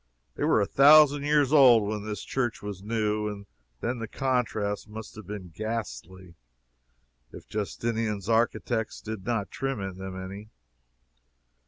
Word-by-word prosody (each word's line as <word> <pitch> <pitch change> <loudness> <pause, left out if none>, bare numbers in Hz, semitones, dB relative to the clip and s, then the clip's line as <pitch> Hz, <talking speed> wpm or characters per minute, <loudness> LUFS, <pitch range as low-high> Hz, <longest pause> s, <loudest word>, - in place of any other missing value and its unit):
They - - -4
were - - +3
a 100 - +2
thousand 145 +3 +6
years 145 -1 +3
old 120 -8 +7
when 105 0 -3
this 105 -1 -5
church 120 -5 -2
was 100 -2 -6
new, 105 0 -1
and 100 -1 -6 0.4
then 120 +1 -2
the 115 - -4
contrast 110 -5 -1
must 110 0 -8
have 110 -4 -11
been 100 -4 -7
ghastly 95 - -5 1.0
if - - -12
Justinian's 105 +1 -3
architects 115 0 0
did 110 -2 -7
not 110 -5 -1
trim 135 -1 -3
them 95 -1 -6
any. 100 +3 -8
110 Hz, 140 wpm, -27 LUFS, 100-120 Hz, 1.0 s, old